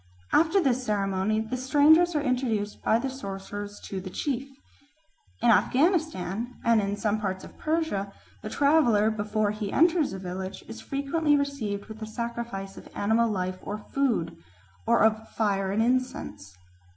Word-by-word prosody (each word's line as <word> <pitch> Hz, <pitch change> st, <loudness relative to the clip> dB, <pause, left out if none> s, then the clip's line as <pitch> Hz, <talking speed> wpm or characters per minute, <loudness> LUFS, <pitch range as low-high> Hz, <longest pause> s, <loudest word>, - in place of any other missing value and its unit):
After 330 Hz, +5 st, +4 dB
this 260 Hz, -6 st, +1 dB
ceremony 205 Hz, -1 st, 0 dB
the 220 Hz, +3 st, -4 dB
strangers 300 Hz, +7 st, +4 dB
are 295 Hz, -, +1 dB
introduced 240 Hz, -6 st, -1 dB
by 220 Hz, -, +3 dB
the 270 Hz, -, -2 dB
sorcerers 205 Hz, -4 st, -6 dB
to 190 Hz, -1 st, -5 dB
the 185 Hz, -, -7 dB
chief. 270 Hz, +6 st, -3 dB, 0.9 s
In 240 Hz, -, +6 dB
Afghanistan 250 Hz, -, +1 dB
and 230 Hz, -2 st, +4 dB
in 200 Hz, 0 st, -2 dB
some 210 Hz, 0 st, 0 dB
parts 190 Hz, -2 st, -3 dB
of -, -, -13 dB
Persia 310 Hz, -12 st, -1 dB, 0.3 s
the 215 Hz, -, -6 dB
traveller, 240 Hz, -7 st, +3 dB
before 210 Hz, 0 st, 0 dB
he 210 Hz, -2 st, -4 dB
enters 330 Hz, -1 st, +3 dB
a 190 Hz, -, -5 dB
village, 185 Hz, +1 st, -6 dB
is 110 Hz, 0 st, -8 dB
frequently 290 Hz, +2 st, +1 dB
received 250 Hz, -8 st, -2 dB
with 220 Hz, 0 st, -11 dB
a 220 Hz, -, -4 dB
sacrifice 235 Hz, -4 st, -5 dB
of -, -, -11 dB
animal 225 Hz, +3 st, +2 dB
life 185 Hz, -2 st, -2 dB
or 205 Hz, -, -4 dB
food, 235 Hz, -4 st, -1 dB, 0.5 s
or -, -, +4 dB
of 220 Hz, 0 st, +2 dB
fire 195 Hz, -3 st, +1 dB
and 215 Hz, +3 st, +2 dB
incense. 250 Hz, -, -2 dB
220 Hz, 155 wpm, -27 LUFS, 200-270 Hz, 0.9 s, In